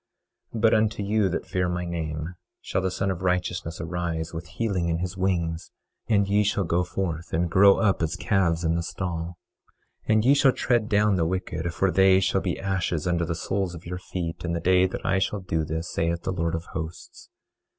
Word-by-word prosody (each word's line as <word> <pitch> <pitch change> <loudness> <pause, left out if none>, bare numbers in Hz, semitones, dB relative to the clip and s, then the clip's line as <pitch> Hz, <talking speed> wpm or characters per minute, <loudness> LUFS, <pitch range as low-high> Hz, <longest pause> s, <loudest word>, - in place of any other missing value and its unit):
25:2 110 - -3
But 115 0 +5
unto 110 -1 +2
you 105 -1 +2
that - - -3
fear 90 -1 -1
my 90 0 -2
name, 80 -1 -4 0.3
shall 95 - -2
the 95 - 0
Son 95 +1 -1
of 90 - -5
Righteousness 90 -2 -1
arise 85 -1 -3
with 85 +1 -6
healing 95 -2 -1
in 85 - +1
his 90 +1 -4
wings; 85 -3 -1 0.4
and 100 -3 +3
ye 100 +1 +3
shall 100 0 +1
go 85 +1 +1
forth 90 -2 -3
and 85 +1 0
grow 100 +2 +7
up 100 -5 +2
as 80 +1 0
calves 95 -4 +1
in 80 0 +2
the 85 - 0
stall. 85 -1 -4 0.7
25:3 110 - +3
And 110 +1 +3
ye 135 - +7
shall 140 -2 +4
tread 120 -3 +1
down 105 -2 +3
the 85 - +2
wicked; 85 -2 -2
for 95 +3 +2
they 95 +1 +5
shall 95 0 +1
be - - -2
ashes 95 -5 -1
under 85 -1 +1
the 85 - -1
soles 95 +2 -2
of 85 - -11
your 90 +1 -5
feet 85 -2 -5
in 85 -1 -2
the 85 - -1
day 90 +2 +4
that 95 - -6
I 95 0 +2
shall 95 +2 -1
do 80 -3 -1
this, 80 +2 -4
saith 85 +1 -1
the - - -1
Lord 85 -2 -1
of 80 - -4
Hosts. 80 +1 -7
90 Hz, 215 wpm, -25 LUFS, 85-95 Hz, 0.7 s, grow